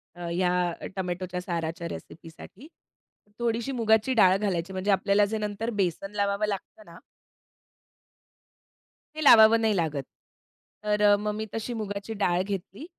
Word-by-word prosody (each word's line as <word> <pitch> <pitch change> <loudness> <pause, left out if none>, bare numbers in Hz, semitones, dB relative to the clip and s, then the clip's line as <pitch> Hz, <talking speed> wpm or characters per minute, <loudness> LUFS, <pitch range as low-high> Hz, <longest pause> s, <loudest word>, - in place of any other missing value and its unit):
अ, 175 -1 -7
ह्या 180 -1 0
टोमॅटोच्या 180 -1 -4
साराच्या 170 -1 -4
रेसिपीसाठी. 165 - -11 0.7
थोडीशी 235 +2 -1
मुगाची 225 0 +2
डाळ 190 -5 +5
घालायची 190 -3 -2
म्हणजे 190 +2 -1
आपल्याला 200 +1 +3
जे 220 - -2
नंतर 210 +2 -3
बेसन 190 +2 -2
लावावं 200 +1 0
लागतं 210 +1 -6
ना 170 -2 -14 2.2
हे 310 - -5
लावावं 225 -4 +7
नाही 220 -1 +2
लागत. 155 -6 -1 0.8
तर 210 0 0
अ, 205 0 +6
मग 210 +1 -3
मी 220 +1 -4
तशी 225 +2 -4
मुगाची 205 -1 -5
डाळ 180 -4 +1
घेतली 200 - -6
200 Hz, 135 wpm, -26 LUFS, 180-220 Hz, 2.2 s, लावावं